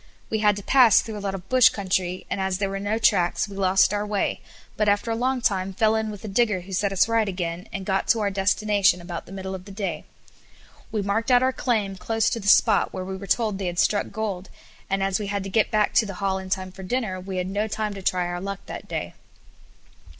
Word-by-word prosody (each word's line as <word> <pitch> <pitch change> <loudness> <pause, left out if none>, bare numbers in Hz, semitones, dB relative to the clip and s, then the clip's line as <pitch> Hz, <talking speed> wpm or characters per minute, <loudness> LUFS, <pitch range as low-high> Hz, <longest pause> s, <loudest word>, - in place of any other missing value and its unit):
We 220 - 0
had 210 -1 +3
to 205 - -7
pass 250 -4 +6
through 215 -2 -5
a - - -8
lot 195 -1 -2
of 190 0 -9
bush 255 +1 +6
country, 185 -2 -2
and 195 - -3
as 190 -1 0
there 195 0 -1
were 195 - -3
no 205 +2 -1
tracks 180 -4 +2
we 200 - -10
lost 190 0 +3
our 205 0 0
way, 210 -1 -1 0.3
but 210 -1 +2
after 205 +3 +1
a - - 0
long 255 +2 0
time 195 -3 0
fell 215 +3 +2
in 220 0 -1
with 205 -1 -8
a - - -4
digger 210 -2 +1
who 190 +2 -10
set 200 +2 0
us 195 +2 +3
right 225 -2 +1
again, 175 -1 -4
and 195 -1 -5
got 190 0 0
to 230 - +3
our 200 -1 0
destination 200 -1 +2
about 175 -1 -7
the - - -12
middle 190 0 -5
of 185 -1 -7
the 200 - -10
day. 190 -6 -4 0.9
We 215 -2 -1
marked 210 +4 -1
out 250 0 +5
our 260 0 +2
claim 210 -7 -1
close 225 +3 0
to 230 - -2
the 200 - -7
spot 210 0 +5
where 185 -1 -5
we 190 0 -5
were 195 +1 -8
told 215 -4 0
they 190 - -2
had 175 0 -4
struck 205 +3 +2
gold, 200 -4 -4 0.4
and 195 0 0
as 195 +2 0
we 210 - -4
had 200 -1 -2
to 195 - -6
get 220 +2 +2
back 210 -1 +1
to 220 - +3
the 200 - -6
hall 190 0 -1
in 190 0 -8
time 185 -1 -2
for 190 - -11
dinner, 190 -1 -2
we 185 0 -6
had 180 - -1
no 205 +3 -1
time 215 -1 -3
to 195 - -8
try 180 -1 0
our 175 0 -4
luck 195 0 -5
that - - -8
day. - - -4
200 Hz, 260 wpm, -24 LUFS, 190-215 Hz, 0.9 s, pass